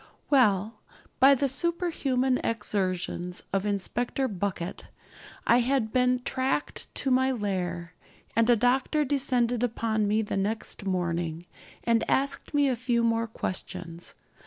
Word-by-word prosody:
Well, 215 -5 +3 0.4
by 275 +2 +7
the 275 +2 +1
superhuman 270 -4 0
exertions 185 -5 -2
of 195 +1 +1
Inspector 240 +6 -1
Bucket 190 -2 -4 0.6
I 240 - +5
had 245 -3 0
been 250 0 +2
tracked 265 +3 -1
to 270 - 0
my 260 +1 +3
lair, 180 -6 -3 0.4
and 230 +1 +3
a 240 - +7
doctor 260 +6 +2
descended 250 -4 +1
upon 220 -3 0
me 215 +2 +2
the 205 - -3
next 205 0 -3
morning, 170 -2 -1 0.4
and 230 -1 +2
asked 275 +1 0
me 290 -1 +3
a 260 - +1
few 240 0 0
more 230 0 +1
questions. 180 -5 -5
230 Hz, 130 wpm, -27 LUFS, 195-260 Hz, 0.6 s, by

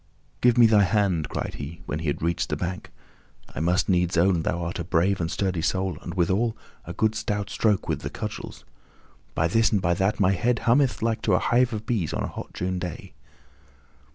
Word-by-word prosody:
"Give 125 0 +4
me 120 - +8
thy 110 -2 +5
hand," 100 -5 +1
cried - - -4
he, 80 +4 -7
when 75 - -3
he 80 - -4
had 70 - -2
reached 85 0 0
the - - 0
bank. 90 +1 -4 0.6
"I - - -5
must 90 +4 +1
needs 90 -2 +1
own 85 0 +3
thou 85 +2 -2
art 85 +1 -4
a - - -2
brave 90 +3 +1
and 80 - -1
a - - -6
sturdy 95 -4 -1
soul 95 +2 -1
and, 85 - -7
withal, 100 +6 +1 0.3
a 85 - -6
good 110 +4 +1
stout 105 -2 -3
stroke 105 -4 +1
with - - -1
the - - -4
cudgels. - - -7 0.7
By 80 - +2
this 115 +6 +2
and 105 - +2
by 90 -2 +1
that, 95 +4 0
my 95 -2 +4
head 120 +6 0
hummeth 125 0 +3
like 115 -1 0
to 100 - +2
a - - +4
hive 125 +1 +2
of 110 -1 -5
bees 110 - -1
on - - -2
a - - -2
hot - - -7
June 90 0 -3
day." 90 -2 -6
95 Hz, 220 wpm, -25 LUFS, 85-110 Hz, 0.7 s, me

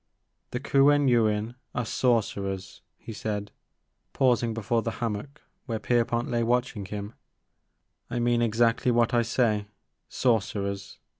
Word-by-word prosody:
The 120 - -3
Kuen 145 +1 +4
Yuin 110 -2 +2 0.2
are 125 - -1
sorcerers," 100 -6 -1 0.2
he 115 - -9
said, 105 -1 -4 0.6
pausing 120 -3 +2
before 115 +1 0
the 115 0 -3
hammock 120 +5 -4 0.2
where 115 -3 -1
Kerpont 120 +1 +1
lay 120 -1 0
watching 120 -3 0
him; 105 +2 -6 0.5
*' - - -50
I 120 - -3
mean 120 0 +2
exactly 115 +2 +2
what 120 -1 +2
I 120 - +4
say, 115 -3 +1 0.2
— - - -53
sorcerers. 100 -4 -1
115 Hz, 135 wpm, -27 LUFS, 105-120 Hz, 0.6 s, Kuen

